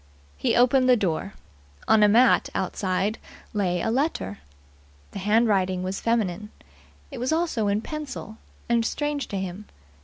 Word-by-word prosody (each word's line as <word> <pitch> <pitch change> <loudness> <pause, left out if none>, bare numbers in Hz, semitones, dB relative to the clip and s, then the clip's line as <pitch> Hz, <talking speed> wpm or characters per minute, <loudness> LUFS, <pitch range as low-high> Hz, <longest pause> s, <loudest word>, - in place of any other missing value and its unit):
He 70 - 0
opened 255 +1 +4
the 250 - +6
door. 195 -1 -2 0.5
On 220 -1 +5
a 210 - +7
mat 235 +5 +4
outside 195 +2 -1 0.3
lay 180 -4 0
a 225 - 0
letter. 245 - -1 0.7
The - - -6
handwriting 195 -3 +2
was 190 +1 -4
feminine. 210 -3 -1 0.6
It 265 - -7
was 250 +4 -1
also 315 -10 0
in 205 +1 +1
pencil, 270 -7 -7 0.3
and 235 -1 +2
strange 295 +4 -2
to 200 - -4
him. 190 +2 -5
215 Hz, 145 wpm, -25 LUFS, 190-250 Hz, 0.7 s, a